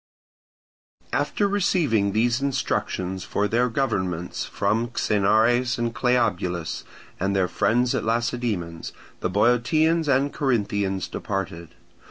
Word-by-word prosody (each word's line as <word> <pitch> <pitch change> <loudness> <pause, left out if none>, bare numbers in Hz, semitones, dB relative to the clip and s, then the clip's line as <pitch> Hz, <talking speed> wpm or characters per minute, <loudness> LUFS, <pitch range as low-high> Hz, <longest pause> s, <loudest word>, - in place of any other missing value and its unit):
After 205 - +1
receiving 160 - +1
these 120 +4 +1
instructions 95 -8 -2
for 105 - -1
their 120 +3 +1
governments 95 -9 -2
from 115 +2 0
Xenares 120 +3 +2
and 120 -1 -1
Cleobulus 95 -10 0 0.4
and 95 +1 0
their 95 -2 +2
friends 120 +7 +1
at 125 -4 -1
Lacedaemon, 115 -7 -1 0.4
the - - -1
Boeotians 135 - +2
and 140 +1 +2
Corinthians 100 -8 0
departed. 85 -5 -5
115 Hz, 105 wpm, -24 LUFS, 95-125 Hz, 0.4 s, Xenares